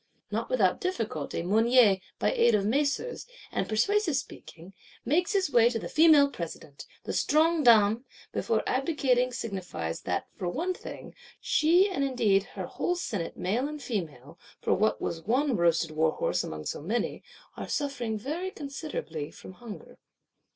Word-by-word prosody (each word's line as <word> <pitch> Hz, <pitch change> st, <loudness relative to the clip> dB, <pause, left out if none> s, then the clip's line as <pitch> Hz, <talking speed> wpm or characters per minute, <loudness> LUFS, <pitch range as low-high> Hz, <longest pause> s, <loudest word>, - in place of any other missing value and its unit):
Not -, -, -2 dB
without -, -, +2 dB
difficulty, 255 Hz, -, -3 dB
Mounier, 220 Hz, +1 st, +4 dB, 0.2 s
by -, -, +1 dB
aid 465 Hz, -, +4 dB
of 200 Hz, -1 st, +1 dB
macers, 285 Hz, -, -1 dB, 0.2 s
and -, -, -2 dB
persuasive 345 Hz, -, +2 dB
speaking, 190 Hz, -9 st, -7 dB, 0.3 s
makes 335 Hz, -, +1 dB
his 385 Hz, -7 st, +1 dB
way 235 Hz, -2 st, +5 dB
to 240 Hz, -, -2 dB
the -, -, -5 dB
Female 310 Hz, -3 st, +6 dB
President: 165 Hz, -, -8 dB, 0.2 s
the -, -, -4 dB
Strong 315 Hz, 0 st, +2 dB
Dame 220 Hz, 0 st, +5 dB, 0.3 s
before 225 Hz, -1 st, 0 dB
abdicating 260 Hz, -3 st, +1 dB
signifies 185 Hz, -, -4 dB
that, 90 Hz, -1 st, -2 dB
for 180 Hz, -4 st, -3 dB
one 340 Hz, -, -1 dB
thing, -, -, -10 dB, 0.3 s
she 345 Hz, +6 st, +4 dB
and 370 Hz, -8 st, -2 dB
indeed 220 Hz, -7 st, +2 dB
her -, -, -4 dB
whole 355 Hz, -, -2 dB
senate 205 Hz, -, -4 dB
male 225 Hz, +9 st, 0 dB
and 300 Hz, 0 st, -6 dB
female 165 Hz, -, -5 dB, 0.2 s
(for -, -, +1 dB
what 215 Hz, +2 st, +1 dB
was 165 Hz, -, -3 dB
one 255 Hz, -, +1 dB
roasted 170 Hz, -2 st, +2 dB
warhorse 155 Hz, 0 st, 0 dB
among 75 Hz, 0 st, -6 dB
so -, -, -4 dB
many?) 220 Hz, +10 st, -2 dB, 0.3 s
are -, -, -7 dB
suffering 250 Hz, -7 st, -2 dB
very 315 Hz, -, -4 dB
considerably 275 Hz, -, -6 dB
from -, -, -12 dB
hunger. 225 Hz, +1 st, -11 dB
240 Hz, 150 wpm, -28 LUFS, 195-300 Hz, 0.3 s, Female